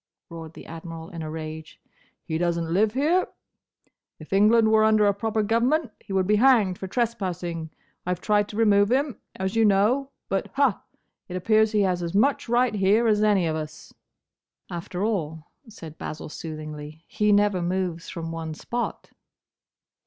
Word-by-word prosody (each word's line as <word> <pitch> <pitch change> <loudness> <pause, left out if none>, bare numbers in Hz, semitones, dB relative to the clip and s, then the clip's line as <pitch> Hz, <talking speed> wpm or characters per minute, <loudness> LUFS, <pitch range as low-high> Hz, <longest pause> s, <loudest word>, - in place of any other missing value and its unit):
roared 165 -1 -8
the - - -12
Admiral, 165 0 -8
in 170 -2 -7
a 155 - -5
rage. 155 0 -7 0.4
"He 160 0 -3
doesn't 170 -1 -1
live 210 +3 +2
here. 325 +7 +2 0.9
If 155 +4 -9
England 220 +3 +5
were 220 0 +5
under 215 -1 +4
a 200 - +4
proper 220 +2 -1
government, 240 +6 +1
he - - -13
would 190 -1 +1
be 210 +2 +3
hanged 220 -7 +4
for 190 - -5
trespassing. 180 -8 -2 0.3
I 180 0 -1
've - - -20
tried 205 +1 +2
to 210 - -7
remove 205 -2 +4
him, 270 -2 0 0.2
as 190 +3 -3
you 225 - +4
know, 215 +7 +3 0.2
but—ha!—it 200 -4 -3
appears 215 +4 +3
he 210 - +3
has 180 -2 +1
as 170 +1 -4
much 255 +3 +2
right 240 0 +2
here 205 +3 +3
as 210 -2 +3
any 205 -4 +3
of 160 -1 -1
us." 155 -1 -7 0.8
"After 175 +2 -4
all," 160 -7 -3 0.2
said 165 -8 -11
Basil, 155 - -6
soothingly, 155 0 -8
"he 210 0 +1
never 205 -2 +3
moves 175 -1 -2
from 165 -1 -5
one 160 -1 -5
spot." 240 +8 -4
195 Hz, 165 wpm, -25 LUFS, 165-220 Hz, 0.9 s, England